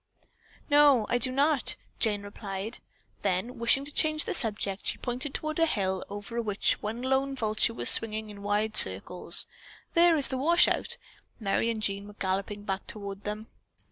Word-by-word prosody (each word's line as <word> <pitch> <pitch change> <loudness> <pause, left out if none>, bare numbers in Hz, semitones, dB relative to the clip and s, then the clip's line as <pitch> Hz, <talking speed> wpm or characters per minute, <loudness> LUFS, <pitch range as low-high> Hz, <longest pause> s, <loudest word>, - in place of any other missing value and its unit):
"No, 290 -6 +5
I 245 - +1
do 255 +2 0
not," 280 0 +2 0.2
Jane 205 -2 +1
replied. 205 +1 -6 0.4
Then 205 +6 -2
wishing 235 +4 +2
to 290 - -7
change 310 0 0
the - - -3
subject, 205 -4 -2
she - - -1
pointed 255 +3 -5
toward 310 +1 -3
a 330 - +4
hill 190 -8 -1
over 205 +4 -5
which 205 -3 0
one 225 +4 -5
lone 270 +1 0
vulture 220 -1 0
was - - 0
swinging 220 -1 +5
in 200 -1 -11
wide 210 +1 -1
circles. 95 - +3 0.5
"There 340 -1 +5
is 285 - +4
the 260 - -2
washout!" 340 +5 +3 0.4
Merry 215 +2 0
and 220 -2 -3
Jean 200 0 -1
were 205 - -12
galloping 200 +1 -3
back 195 -1 -4
toward 200 -2 -6
them. 210 +1 -6
220 Hz, 170 wpm, -28 LUFS, 205-265 Hz, 0.5 s, No